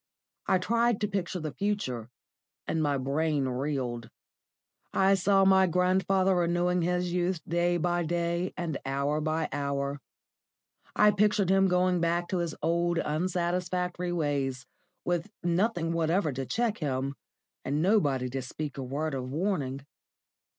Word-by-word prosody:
I 190 - +4
tried 235 +4 +1
to 210 - +1
picture 190 -3 -2
the 155 -2 -4
future, 130 - -2 0.6
and 160 - -1
my 145 -2 +1
brain 140 +2 0
reeled. 125 -3 -2 0.8
I 195 +1 +4
saw 195 +1 +4
my 190 -1 +5
grandfather 185 +2 +2
renewing 175 +1 +1
his 180 +1 0
youth 180 0 0
day 175 +1 +1
by 175 +1 0
day 170 +2 -1
and 165 -5 -3
hour 140 +3 -1
by 155 +1 0
hour. 140 0 -2 0.9
I 210 0 +6
pictured 205 -2 +2
him 195 0 +4
going 180 0 +2
back 170 +1 +1
to 185 - 0
his 170 -2 -2
old, 170 +1 +1
unsatisfactory 180 +2 -1
ways, 140 -6 -1 0.4
with 175 -2 -1
nothing 175 -1 +1
whatever 165 -1 +1
to 130 0 -4
check 230 -2 0
him, 135 -3 -1 0.5
and 145 +2 -1
nobody 150 - +2
to 135 +1 -2
speak 140 +3 -6
a - - -3
word 145 +4 -3
of 130 -1 -4
warning. 140 -4 -2
170 Hz, 140 wpm, -29 LUFS, 145-185 Hz, 0.9 s, I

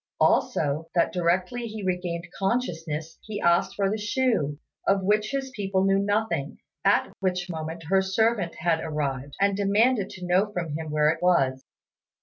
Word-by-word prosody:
Also, 150 +3 +2
that 170 - +2
directly 185 +7 0
he 215 -2 -6
regained 180 -2 -2
consciousness 165 -8 -2
he 215 -2 -6
asked 175 +2 +2
for 200 -1 +1
the 215 +3 -1
shoe, 210 - 0 0.3
of 195 -1 +3
which 210 +2 +2
his 270 -1 -3
people 195 -4 0
knew 195 0 +3
nothing; 200 -8 -1 0.3
at - - +3
which 180 -1 -1
moment 160 +1 -5
her 190 +5 +3
servant 195 -1 +1
had 165 0 +1
arrived, 140 -3 -3
and 200 0 +3
demanded 205 +2 +2
to 180 -1 -8
know 185 +4 +2
from 170 -5 -3
him 160 0 -4
where 150 0 +3
it 160 - -5
was. 135 -8 +2
185 Hz, 160 wpm, -26 LUFS, 165-205 Hz, 0.3 s, of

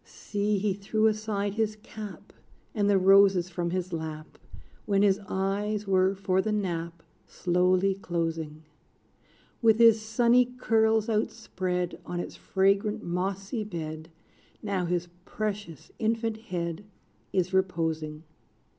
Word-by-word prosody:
See, 205 0 -2
he 200 0 0
threw 215 +3 0
aside 215 -2 0
his 215 0 0
cap, 215 -1 -10 0.4
And 205 -3 +1
the 200 - +5
roses 190 -1 +5
from 175 -1 -2
his 180 0 -3
lap, 155 -1 -6 0.5
When 200 -1 +3
his 200 -1 +4
eyes 205 +2 -1
were, 190 0 +3
for 190 -1 +1
the 215 - -2
nap, 170 -5 -3 0.2
Slowly 180 +2 +2
closing: 165 -4 -3 1.0
Wit 220 -2 +5
his 230 -1 +6
sunny 235 +3 +4
curls 220 -2 +2
outspread, 185 -6 -2
On 175 0 -4
its - - -5
fragrant 200 +3 +1
mossy 195 +5 -2
bed, 160 -5 -6 0.5
Now 195 -4 -1
his 175 0 -1 0.2
precious 205 -8 -5
infant 225 0 0
head 170 -1 -3 0.5
Is 185 0 0
reposing. 160 -4 -1
195 Hz, 120 wpm, -28 LUFS, 175-215 Hz, 1.0 s, his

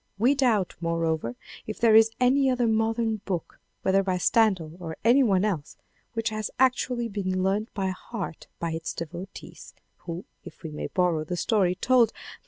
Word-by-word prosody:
We 240 +7 +4
doubt, 235 -9 +1
moreover, 165 -7 -1 0.3
if 215 - -5
there 230 -2 +5
is 225 0 +7
any 265 +2 +4
other 250 -1 +1
modern 225 0 +1
book 190 -5 -5 0.2
whether 195 +1 +3
by 185 -2 -1
Stendhal 180 -6 +2
or 165 -3 -6
any 240 +5 +5
one 200 -6 +3
else, 170 -9 -3 0.4
which 225 0 -1
has 215 -1 -3
actually 250 -2 +1
been 185 -3 -2
learnt 205 +4 0
by 195 -2 -1
heart 185 -2 -6
by 170 -1 -3
its 160 0 -4
devotees, 175 +4 -8 0.2
who, 170 +1 -7 0.2
if - - -13
we 160 - -5
may 150 - -4
borrow 175 -4 +1
the 175 +3 -4
story 185 -2 +2
told 240 +1 +3
by - - -17
M. - - -13
200 Hz, 180 wpm, -26 LUFS, 175-230 Hz, 0.4 s, is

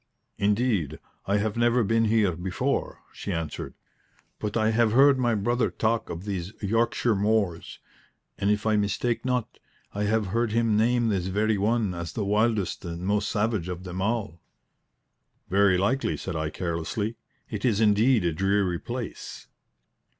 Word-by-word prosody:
"Indeed, 105 - +1 0.3
I 100 +1 +2
have 105 0 -1
never 120 +1 +3
been 115 +2 +2
here 105 -5 +2
before," 90 +2 -2
she 100 - -5
answered. 80 -4 -4 0.6
"But 105 +1 -2
I 110 0 +2
have 110 -1 +2
heard 135 +1 +6
my 120 -2 +2
brother 120 +4 +1
talk 115 +1 -1
of 85 +4 -6
these 95 -1 -4
Yorkshire 115 +2 +1
moors; 100 -4 0 0.6
and, 100 - +1
if 105 0 +1
I 110 -1 +3
mistake 115 +3 0
not, 125 -2 -2 0.3
I 105 +1 -1
have 110 0 +1
heard 115 -1 +1
him 115 -2 +2
name 120 +2 +2
this 95 -3 -1
very 105 +2 +1
one 110 -1 +1
as 85 -2 -5
the 105 - -2
wildest 105 -1 +1
and 85 +1 -5
most 105 +1 +1
savage 105 -4 -1
of 90 0 -5
them 95 0 -5
all." 105 -5 -2 1.1
"Very 100 -1 +4
likely," 105 +9 0
said 95 - -5
I, 80 -1 -1
carelessly. 85 +7 -3 0.4
"It 105 -3 -4
is 110 -5 +2
indeed 110 0 +4
a 85 - +1
dreary 95 0 +1
place." - - -6
105 Hz, 160 wpm, -26 LUFS, 95-115 Hz, 1.1 s, heard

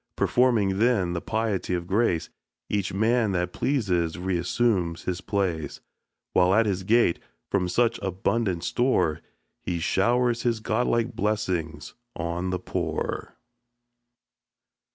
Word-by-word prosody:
Performing, 110 -6 +2
then, 110 -7 +2
the 85 - -3
piety 110 -5 -1
of 85 -1 -3
grace, 95 -3 0 0.4
Each 100 -3 0
man 110 +1 +2
that 90 0 -1
pleases 95 - 0
reassumes 90 0 0
his 90 0 -3
place; 90 -7 -2 0.5
While 90 +1 +4
at 115 +1 +4
his 95 -3 -1
gate, 110 -2 +3 0.3
from 90 -3 +1
such 120 +5 +2
abundant 95 -1 -1
store, 120 -10 +1 0.4
He 90 - -2
showers 120 +7 +1
his 115 -2 0
godlike 115 +1 0
blessings 90 -9 -2 0.2
on 85 +2 -2
the 90 - 0
poor. - - -3
95 Hz, 115 wpm, -26 LUFS, 90-115 Hz, 0.5 s, While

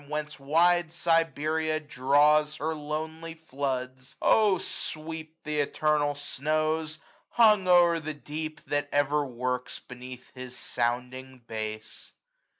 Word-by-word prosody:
Whence 150 0 -4
wide 165 +4 +3
Siberia 160 -2 +1
draws 150 +2 +3
her 155 +1 -2
lonely 160 +2 -5
floods; 130 -4 -4 0.4
sweep 160 -1 -4
th* 150 -1 -2
eternal 150 -2 +1
snows, 155 +2 -1 0.3
hung 210 -5 +5
o'er 175 -2 +6
the 155 -1 -5
deep. 155 +2 -6
That 145 0 -1
ever 145 +1 +2
works 125 -1 -3
beneath 125 0 -11
his 125 -1 -8
sounding 125 +1 -3
base. 110 -1 -6
150 Hz, 105 wpm, -28 LUFS, 130-160 Hz, 0.4 s, o'er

